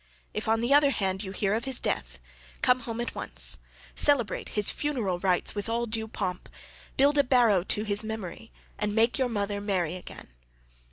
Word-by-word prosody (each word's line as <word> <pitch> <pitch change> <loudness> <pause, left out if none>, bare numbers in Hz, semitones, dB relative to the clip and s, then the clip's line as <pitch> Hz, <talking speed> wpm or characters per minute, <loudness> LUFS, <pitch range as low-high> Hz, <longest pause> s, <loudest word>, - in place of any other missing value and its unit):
If - - -3
on 225 0 +2
the 240 +4 +2
other 290 0 +6
hand 190 -7 -1
you 190 -3 -5
hear 195 +1 0
of 225 +2 -1
his 265 -2 +2
death, - - -2 0.5
come 255 0 +4
home 230 -2 -6
at 240 - -3
once, - - +1 0.3
celebrate 275 -7 +2
his 210 - +3
funeral 235 -12 -2
rites 180 -1 +1
with 205 +1 -4
all 235 +1 0
due 220 -1 -1
pomp, 185 -4 -4 0.5
build 285 +2 +4
a - - +6
barrow 240 -7 +4
to 210 - 0
his 205 0 +1
memory, 220 -1 -6 0.3
and 210 0 -1
make 230 +4 +2
your 260 -2 +1
mother 205 -2 -2
marry 185 -5 -1
again. 185 - -10
220 Hz, 185 wpm, -28 LUFS, 200-245 Hz, 0.5 s, other